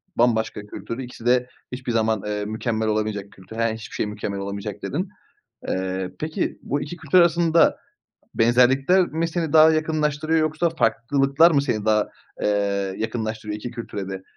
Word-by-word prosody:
bambaşka 110 -3 +1
kültür 105 +2 -7
ikisi 120 -2 -8
de 125 0 +3 0.2
hiçbir 125 -1 -4
zaman, 110 -2 +1
eee, 105 0 -2
mükemmel 110 +1 -2
olamayacak 105 -2 -2
kültür. 95 +4 -13
He, - - -1
yani 115 -1 +1
hiçbir 110 - -9
şey - - 0
mükemmel 105 -1 -4
olamayacak 100 +1 -5
dedin. 180 +7 -2 0.6
Eee, 95 0 -2
peki 155 +1 -2
bu 145 +1 -1
2 160 +4 -6
kültür 160 +1 +1
arasında 170 -1 +4 0.6
benzerlikler 130 +10 +4
mi 165 +1 -2
seni 165 -2 -2
daha 160 0 +8
yakınlaştırıyor 155 0 +1
yoksa 155 +2 +1
farklılıklar 140 +2 +3
mı 140 -4 +3
seni 110 -7 -1
daha, 105 -1 +2 0.3
eee, 100 -2 0
yakınlaştırıyor 110 -1 -3
2 120 +3 -6
kültüre 110 -5 -6
de? 95 -1 -6
115 Hz, 160 wpm, -23 LUFS, 105-155 Hz, 0.6 s, daha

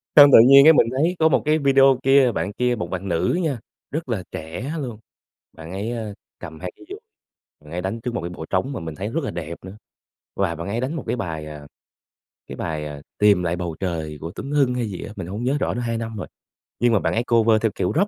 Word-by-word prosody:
Xong 145 -1 +10
tự - - +11
nhiên 140 +1 +9
cái 160 - +9
mình 125 - +4
thấy 165 +6 +2
có 160 0 +5
một 145 - +2
cái 155 +1 +3
video 135 -2 +4
kia, 135 -2 +5
bạn 95 0 -3
kia, 125 +2 0
một 90 -6 -5
bạn 95 +1 -4
nữ 95 - 0
nha, 140 -7 -1 0.3
rất 155 -2 -4
là 105 -6 -2
trẻ 85 - -6
luôn, 120 -6 -6 0.5
bạn 80 +1 -10
ấy, 100 +4 -3
ơ, 110 -4 -5 0.2
cầm 80 0 -10
hai 90 0 -5
cái - - -16
dùi, 400 +2 -8 0.6
bạn 75 0 -15
ấy 90 - -2
đánh 95 +5 -4
trước 120 +1 -4
một 120 - -1
cái 85 - -4
bộ 85 -2 -7
trống 95 +9 0
mà 130 - -5
mình 80 -1 -6
thấy 95 +6 -4
rất 155 +6 -2
là - - -2
đẹp 85 0 -6
nữa, 95 +2 -9 0.6
và 95 -4 0
bạn 85 +4 -6
ấy 110 +4 -2
đánh 135 +5 -2
một 160 - -4
cái - - 0
bài, 80 -8 -4
à, 75 -1 -10 0.8
cái - - -7
bài, 80 -2 -4
ờ, 75 -1 -7 0.2
"Tìm 105 -3 +4
lại 85 0 0
bầu 85 -2 -4
trời" 80 -5 -3
của 80 +2 -5
Tuấn 140 - -6
Hưng 140 -4 +2
hay 120 -3 -2
gì 95 - -6
á, 105 - -8
mình 95 -4 -6
hông 105 +6 -5
nhớ 135 +4 +1
rõ - - -1
nữa - - -3
2 115 -1 -2
năm 115 -1 -5
rồi, 95 - -5 0.5
nhưng 120 -1 +3
mà 110 - +4
bạn - - -1
ấy 115 - 0
cover 115 -2 +3
theo 110 - +2
kiểu 90 - -1
Rock. 195 +6 +3
110 Hz, 265 wpm, -22 LUFS, 85-130 Hz, 0.8 s, tự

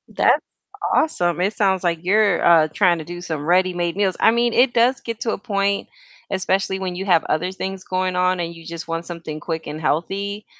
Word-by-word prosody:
That's - - +4 0.5
awesome. 175 - +1
It 200 +3 +1
sounds, 190 -3 +1
like, 170 -2 0
you're, 200 -1 +3
uh, 165 -2 +6
trying 180 -4 +3
to - - -6
do 175 0 -7
some 155 -4 -4
ready-made 175 -1 +1
meals. 195 -2 +1
I 225 - +5
mean, 235 0 +1
it 245 0 +4
does 245 +2 +3
get 230 -1 -6
to 225 - 0
a - - -2
point, 200 -1 -1 0.4
especially 190 0 0
when 185 -2 -4
you 190 +2 -4
have 175 -4 +3
other 165 +4 -1
things 190 0 -5
going 185 0 -1
on 180 0 +1
and 170 0 -3
you, 165 -1 -13
just, 170 0 -7
want 165 0 -3
something 165 -3 -7
quick 160 0 -5
and 150 +1 -5
healthy 200 +7 -2
185 Hz, 210 wpm, -21 LUFS, 170-200 Hz, 0.5 s, uh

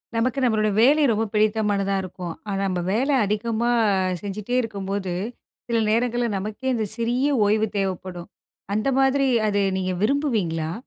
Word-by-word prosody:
நமக்கு 255 +4 0
நம்மளோட 215 -3 +2
வேலை 290 +6 +5
ரொம்ப 220 +1 0
பிடித்தமானதா 210 -2 +1
இருக்கும். 180 -2 -6 0.2
ஆனா 195 0 -1
நம்ம 180 -1 -1
வேல 260 +7 +1 0.2
அதிகமா 225 +3 -1 0.5
செஞ்சுகிட்டே 205 +4 -4
இருக்கும்போது 200 -4 -4 0.5
சில 235 -1 0
நேரங்கள்ல 240 +2 +1
நமக்கே 215 +7 -3
இந்த 220 -2 -1
சிறிய 240 +4 +1 0.2
ஓய்வு 215 +1 +2
தேவைப்படும். 185 -2 -4 0.5
அந்த 215 +5 0
மாதிரி 270 +1 +3 0.2
அதை 205 -1 +1
நீங்க 185 -1 -1
விரும்புவீங்களா? 210 - 0
215 Hz, 135 wpm, -23 LUFS, 195-240 Hz, 0.5 s, வேலை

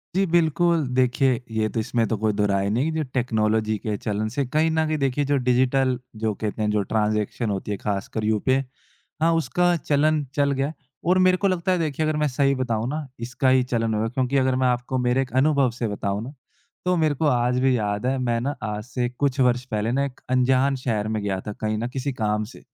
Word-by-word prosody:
जी 195 +1 +3
बिल्कुल। 170 -1 +2
देखिए 130 0 +2
ये 110 -1 0
तो 115 - -3
इसमें 115 0 0
तो 110 - -1
कोई 110 +1 0
दोहराय 100 -1 +1
नहीं 125 +9 0
जो 160 0 -1
टेक्नोलॉज़ी 110 -3 +1
के 105 +1 -3
चलन 105 +1 -2
से 140 - 0
कहीं 155 +5 +1
न 160 0 +1
कहीं 155 0 0
देखिए 140 0 0
जो - - +4
डिजिटल 130 +1 +2 0.3
जो 110 -1 +1
कहते 110 +1 -4
हैं 105 - +1
जो 105 -1 +1
ट्रांज़ेक्शन 105 +1 0
होती 100 +1 -3
है 100 - -2
ख़ासकर 105 +2 -3
यूपीआई 120 +5 +1 0.6
हाँ, 165 +1 +4
उसका 175 +2 +2
चलन 150 +1 +1
चल 140 -1 +2
गया। 135 +2 -1 0.3
और 180 +2 +4
मेरे 185 0 +4
को 200 - +1
लगता 185 -1 0
है 180 - +2
देखिए 155 -1 -1
अगर 155 0 0
मैं 150 0 +2
सही 140 +1 +1
बताऊँ 115 -3 -1
ना 150 0 -4
इसका 125 +3 0
ही 130 0 +4
चलन 115 -3 -1
होगा 110 +1 0
क्योंकि 130 +2 0
अगर 130 -1 +2
मैं - - +4
आपको 125 +1 -1
मेरे 125 +1 +2
एक 130 - -5
अनुभव 140 -1 +3
से 115 0 -3
बताऊँ 100 0 -2
ना 130 +4 -8 0.5
तो 180 0 +2
मेरे 155 -3 +2
को 155 - -1
आज 125 -1 +2
भी 130 -1 +3
याद 105 0 -2
है 130 +1 +1
मैं 120 -2 0
ना 140 +4 -2
आज 105 -1 -3
से 125 0 -2
कुछ 135 +2 -1
वर्ष 125 -1 +3
पहले 110 -2 -1
ना 135 +3 +1
एक 135 -2 -8
अंजान 130 +2 +3
शहर 115 -5 -2
में 110 -1 -2
गया 95 -2 -1
था 105 - -3
कहीं 110 +1 -2
न 115 +2 -2
किसी 135 +1 -2
काम 105 -3 0
से। 110 +4 -11
125 Hz, 225 wpm, -24 LUFS, 110-140 Hz, 0.6 s, जो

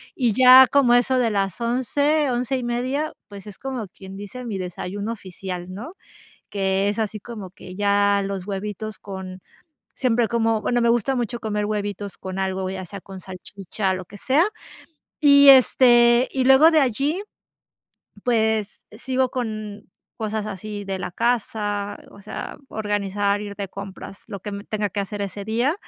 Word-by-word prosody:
Y 240 -6 +1
ya 255 +2 +9
como 275 -4 +4
a 245 - +7
eso 255 +1 +1
de 235 -2 +2
las 195 +1 -1
11, 285 +5 +1
11:30, 250 +3 -1 0.2
pues, 200 0 -11
es 200 -2 -10
como 260 -6 -4
quien 190 +1 -11
dice, 205 +5 -8
mi 210 -4 -3
desayuno 195 +4 -4
oficial, 185 -2 -7
¿no? 240 - -8 0.6
Que 195 0 0
es 210 +2 -3
así 215 -1 -2
como 210 -4 -8
que 185 -1 -11
ya 200 0 +3
los 195 -1 -5
huevitos 210 +2 -5
con 190 -2 -8 0.5
siempre 240 -3 +2
como 225 -2 +1
bueno, 240 +1 +1
me 235 - +3
gusta 240 +3 +2
mucho 240 -1 -2
comer 210 -2 -2
huevitos 205 -1 -4
con 190 0 -6
algo, 190 0 -1
ya 190 0 -5
sea 200 +3 -8
con 190 -1 -10
salchicha, 190 +1 -4
lo 185 - -4
que 205 - -12
sea, 275 - +3 0.8
y, 280 -1 +7
este, 240 -2 +6
y 260 -1 0
luego 275 +5 +7
de 310 -2 +5
allí, 275 - 0 1.0
pues, 220 -3 +1
sigo 260 +4 -1
con 215 -5 -5 0.3
cosas 215 -1 -3
así 205 0 -6
de 195 -1 -3
la - - -4
casa, 210 -2 -1
o 200 - -14
sea, 210 - -6
organizar, 205 -1 -1
ir 205 -1 -7
de 200 -1 -3
compras, 195 0 -9
lo 200 -3 -6
que 205 +1 -6
me 200 0 -5
tenga 210 -1 -2
que 205 - -2
hacer 205 +1 -5
ese 200 0 -5
día, 240 +8 +1
210 Hz, 165 wpm, -23 LUFS, 200-245 Hz, 1.0 s, ya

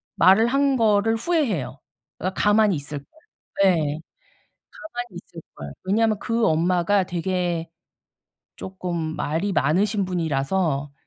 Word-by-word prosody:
말을 205 +5 +5
한 275 +1 +2
거를 225 -1 +3
후회해요. 225 - -1 0.4
그러니까 185 +2 -4
가만히 210 -2 +4
있을걸. 145 -1 -6 0.6
예. 195 - +6 1.0
가만히 245 - -8
있을걸. 75 - -11
왜냐하면 215 +2 +1
그 230 +1 0
엄마가 180 +4 +2
되게 175 -1 -2 0.9
쪼끔 185 -2 -6 0.2
말이 165 +7 -1
많으신 195 +7 +1
분이라서 155 -3 -1
190 Hz, 255 characters per minute, -23 LUFS, 165-220 Hz, 1.0 s, 예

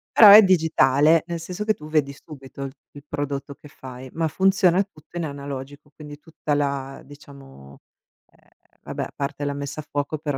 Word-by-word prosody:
Però 215 -3 +9
è 210 +2 +11
digitale, 160 -3 +3
nel 170 -1 -4
senso 180 +5 -6
che 215 0 +1
tu 150 -4 -12
vedi 145 -3 0
subito 140 -2 -11
il 135 - -5 0.2
il 145 0 -13
prodotto 140 0 -5
che 150 - -16
fai, 130 -1 -11
ma 165 0 -1
funziona 190 +2 +2
tutto 175 -4 -22
in 170 - -2
analogico, 140 0 -7
quindi 150 -1 -11
tutta 155 -2 -5
la, 140 -2 -2
diciamo, 135 - -15 0.5
ehm, - - -29 0.3
vabbè - - -5
a - - -9
parte 140 +1 -4
la 145 - -2
messa 140 +1 -6
a 150 - -7
fuoco, 145 +2 -3
però 145 -2 -4
145 Hz, 185 wpm, -23 LUFS, 140-160 Hz, 0.5 s, è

